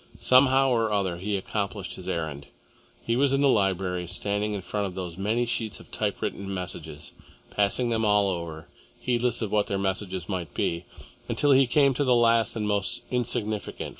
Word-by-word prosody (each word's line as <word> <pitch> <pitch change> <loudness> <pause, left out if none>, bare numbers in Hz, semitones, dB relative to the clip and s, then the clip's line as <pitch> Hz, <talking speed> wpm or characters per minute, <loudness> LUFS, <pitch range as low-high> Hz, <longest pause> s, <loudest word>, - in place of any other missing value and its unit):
Somehow 130 +1 +5
or 115 -3 +1
other 95 -4 0
he 100 +3 -2
accomplished 100 +1 -3
his - - -7
errand. 75 -4 -3 0.6
He 115 - 0
was 135 +1 +3
in 135 - +2
the 140 - +5
library, 95 -6 +1
standing 105 +4 -1
in 100 - -4
front 100 +2 -2
of 90 - -8
those 90 -3 -5
many 110 +6 0
sheets 115 -2 -2
of - - -16
typewritten 100 0 -3
messages, 80 -5 -6 0.4
passing 105 +4 +1
them 115 -1 +1
all 105 -1 +4
over, 85 -3 -5 0.3
heedless 120 -1 +1
of 105 - -3
what 105 -1 +2
their 100 - -1
message 95 -2 -2
might 90 -7 -4
be, 85 +1 -1 0.4
until 145 - +2
he 135 -1 +6
came 140 +2 +4
to 145 - 0
the 125 -3 +4
last 115 -1 +3
and 105 -2 -2
most 100 -2 0
insignificant. 115 -4 -2
105 Hz, 180 wpm, -26 LUFS, 95-120 Hz, 0.6 s, he